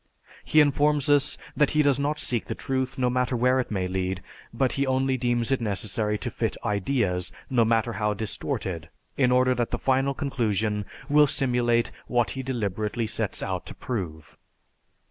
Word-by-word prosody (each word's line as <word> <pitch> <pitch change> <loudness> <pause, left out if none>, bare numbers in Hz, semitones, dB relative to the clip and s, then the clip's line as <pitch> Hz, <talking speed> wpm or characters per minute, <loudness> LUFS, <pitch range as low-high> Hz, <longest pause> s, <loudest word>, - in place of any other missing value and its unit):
He 155 - +5
informs 145 0 +2
us 145 -1 +3 0.2
that 150 -2 +3
he 150 - +5
does 140 -2 +3
not 145 +2 0
seek 120 -6 0
the - - -4
truth, 130 0 -2
no 125 -1 +1
matter 125 0 0
where 125 +2 +3
it 125 - -2
may 95 -3 -1
lead, 95 0 -2 0.3
but 130 +2 +1
he 140 0 0
only 130 0 +1
deems 120 -1 0
it 135 - +1
necessary 105 0 -1
to - - -4
fit - - -2
ideas, 100 -4 0 0.2
no 120 -3 +4
matter 115 +1 +1
how 105 -1 0
distorted, 100 - -3 0.3
in 125 -3 +3
order 130 0 +4
that 120 -2 -1
the - - -1
final 135 +1 +1
conclusion 110 -7 -1 0.2
will 150 0 +5
simulate 120 -3 +1 0.2
what 120 -5 +1
he 130 - -4
deliberately 110 -3 -2
sets - - -2
out - - -3
to - - -7
prove." 85 -10 -5
120 Hz, 175 wpm, -26 LUFS, 105-135 Hz, 0.3 s, He